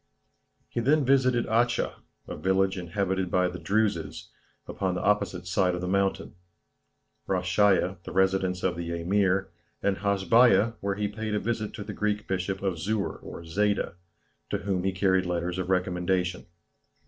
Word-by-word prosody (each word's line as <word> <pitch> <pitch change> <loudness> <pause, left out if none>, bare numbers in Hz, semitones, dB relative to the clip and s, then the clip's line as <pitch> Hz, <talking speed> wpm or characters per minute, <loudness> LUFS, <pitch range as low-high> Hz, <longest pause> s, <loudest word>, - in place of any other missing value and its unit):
He - - -4
then 140 +4 +3
visited 130 -2 +3
Achha, 120 +2 +1 0.3
a - - -5
village 95 +3 +1
inhabited 95 +1 -2
by 90 0 +2
the 90 0 -6
Druses, 85 -4 -1 0.3
upon 95 -2 -2
the - - -3
opposite 100 -3 0
side 90 0 +1
of 90 - -4
the 90 - -3
mountain; 100 +1 0 0.9
Rasheiya, 95 0 +2
the - - -8
residence 95 0 +1
of 90 -2 +1
the 85 0 -3
Emir; 95 +2 +1 0.3
and 100 -1 +1
Hasbeiya, 105 +3 +4
where 100 0 -2
he 105 0 -1
paid 110 +1 -4
a - - +1
visit 115 -1 -3
to 105 - -6
the - - -7
Greek 105 0 -1
Bishop 95 +1 -2
of 95 -4 -1
Szur 105 +3 -2
or - - -9
Szeida, 100 +5 0 0.6
to - - 0
whom 95 -2 -2
he 95 - +2
carried 95 0 +2
letters 90 +1 -2
of 95 - -3
recommendation. 90 -1 0
95 Hz, 160 wpm, -27 LUFS, 90-105 Hz, 0.9 s, Hasbeiya